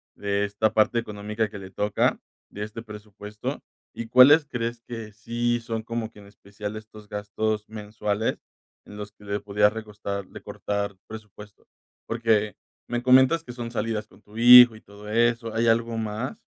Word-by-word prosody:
de 100 0 -1
esta 105 +2 0
parte 110 +2 +3
económica 105 -1 -2
que 105 -1 -9
le 95 -1 -9
toca, 105 +2 0 0.3
de 105 - -6
este 105 +2 -7
presupuesto, 105 -1 -7 0.3
¿y 115 - -6
cuáles 140 +6 +7
crees 120 -3 -4
que 115 -3 -8
sí 120 +3 -1
son 115 -1 -4
como 115 0 -4
que - - -21
en 105 - -13
especial 100 +1 -8
estos 110 -1 -11
gastos 105 +1 -3
mensuales 105 0 -3 0.5
en 105 - -11
los 105 0 -7
que 105 0 -19
le 100 0 -2
podrías 105 0 +2
recostar 100 -3 -5
recortar 100 -1 -4
presupuesto?, 105 -2 -12 0.4
porque 110 -3 +1 0.3
me 120 0 -2
comentas 130 +6 +5
que 125 - -9
son 120 -1 -6
salidas 110 -2 -3
con - - -21
tu 105 +1 -15
hijo 120 0 +10
y 110 - -14
todo 100 +1 -14
eso, 115 0 +1
¿hay 115 +1 +1
algo 115 0 +2
más? 110 -1 -4
110 Hz, 165 wpm, -25 LUFS, 105-115 Hz, 0.5 s, hijo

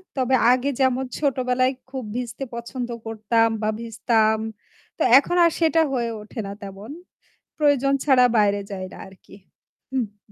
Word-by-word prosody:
তবে 260 -1 +2 0.2
আগে, 255 +2 +1
যেমন 260 0 +2
ছোটবেলায় 255 -2 +1 0.2
খুব 260 -1 -5
ভিজতে 250 +2 -4
পছন্দ 235 +1 -5 0.2
করতাম 225 +1 +1
বা 215 - 0
ভিজতাম, 220 -1 +1 0.6
তো - - -8 0.2
এখন 290 +5 +1
আর 335 - +3
সেটা 325 0 +3
হয়ে 240 -2 -1
ওঠে 215 +3 -9
না - - -6
তেমন। 200 +4 -9 0.7
প্রয়োজন 285 -3 +2
ছাড়া 265 -3 +5
বাইরে 205 -1 +3
যাই 190 -1 -5
না, - - -11
আরকি। 190 0 -19 0.6
হু, 265 - -2 0.3
হু। - - -25
245 Hz, 150 wpm, -23 LUFS, 220-265 Hz, 0.7 s, ছাড়া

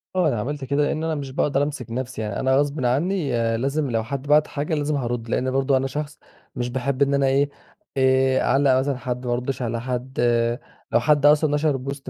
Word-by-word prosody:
آه 180 -3 +3
أنا 120 -7 0
عملت 145 +5 -4
كده، 140 +2 +1
لأن 155 +2 -1
أنا 160 -1 -1
مش 140 -2 -5
باقدر 140 -1 +1
أمسك 140 -6 -5
نفسي 125 -1 -4
يعني 105 -2 -3
أنا 130 0 +2
غصبٍ 145 -1 0
عنّي، 150 +5 0 0.3
لازم 140 +4 -1
لو 115 -1 0
حد 140 +4 -5
بعت 150 +1 +4
حاجة 150 +2 -3
لازم 150 0 0
هارُد، 120 -3 -3
لأن 130 +2 0
برضو 135 0 +2
أنا 135 +1 -1
شخص 145 +1 -5 0.4
مش 120 0 -2
باحب 130 +2 -2
إن 140 0 +3
أنا 140 -1 +2
إيه، 140 +2 +2 0.5
آآ 130 0 +3
أعلّق 135 -2 +3
مثلًا 135 0 -1
حد، 125 0 -4
ما 120 - 0
أردش 125 +2 -3
على 115 -1 -2
حد، 125 +1 -4 0.7
لو - - +4
حد 145 +3 +2
أصلًا 150 0 +4
نشر 150 -2 +1
بوست 135 +1 -6
135 Hz, 215 wpm, -23 LUFS, 125-145 Hz, 0.7 s, بعت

